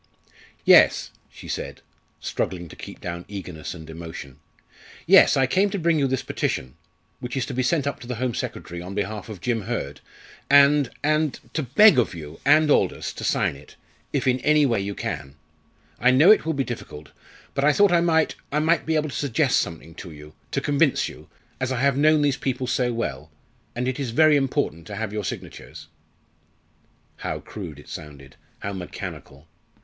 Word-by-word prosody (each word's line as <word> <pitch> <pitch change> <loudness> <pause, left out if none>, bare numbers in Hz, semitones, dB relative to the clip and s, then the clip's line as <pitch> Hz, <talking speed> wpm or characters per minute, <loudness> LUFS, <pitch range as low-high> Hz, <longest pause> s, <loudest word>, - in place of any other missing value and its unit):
"Yes," - - +6 0.2
she - - -13
said, - - -5 0.4
struggling 90 -2 -3
to - - -12
keep - - -10
down 85 0 -5
eagerness 90 -5 -7
and 80 -2 -11
emotion. 80 -4 -9 0.7
"Yes, - - +6
I 135 - +4
came 190 +9 +2
to 200 - -3
bring 170 -3 +2
you 140 - +2
this 130 -1 -1
petition, 65 0 -2 0.5
which 125 0 -5
is 130 - 0
to 135 - -6
be 130 - 0
sent 140 +3 +1
up 140 - -3
to 120 - -11
the 125 - -3
Home 125 +1 -2
Secretary 85 -5 -5
on 90 +2 -7
behalf 105 +1 -3
of 100 -5 -8
Jim 120 0 -1
Hurd, 95 - -4 0.5
and 140 -1 +6
and 155 -1 +1
to 160 - 0
beg 150 - +6
of 105 -7 0
you 75 -1 -9
and 150 +1 +5
Aldous - - +1
to - - -8
sign - - +1
it, 70 +2 -15 0.4
if - - -1
in 130 -1 +2
any 150 +2 +4
way 115 -6 +1
you 100 0 -4
can. 70 +1 -5 0.6
I 125 - +4
know 145 +10 +7
it 215 - +4
will 160 - +1
be 140 -2 0
difficult, 75 - -8 0.4
but 140 - -1
I 150 - +6
thought 200 +4 +4
I 170 -1 +4
might 160 -2 +2 0.2
I 145 - 0
might 160 +2 +2
be 160 - +1
able 155 0 0
to - - -7
suggest 140 0 +1
something 80 -1 -5
to 90 - -9
you 75 -1 -12 0.2
to 140 - -1
convince 145 0 +2
you - - -14 0.3
as 130 0 -1
I 130 - -1
have 140 -1 +3
known 150 +1 +4
these 140 -2 +1
people 130 -1 -2
so 125 0 0
well 75 - -4 0.5
and 125 +1 -2
it 130 +1 -2
is 135 -3 -2
very 155 +6 +5
important 135 - -1
to 105 - -6
have 110 0 -4
your 105 -1 -3
signatures." - - -8 1.3
How - - -4
crude 90 -9 -8
it 75 - -14
sounded 70 -3 -10 0.3
how 100 - -4
mechanical! 85 -5 -8
125 Hz, 195 wpm, -24 LUFS, 90-145 Hz, 1.3 s, know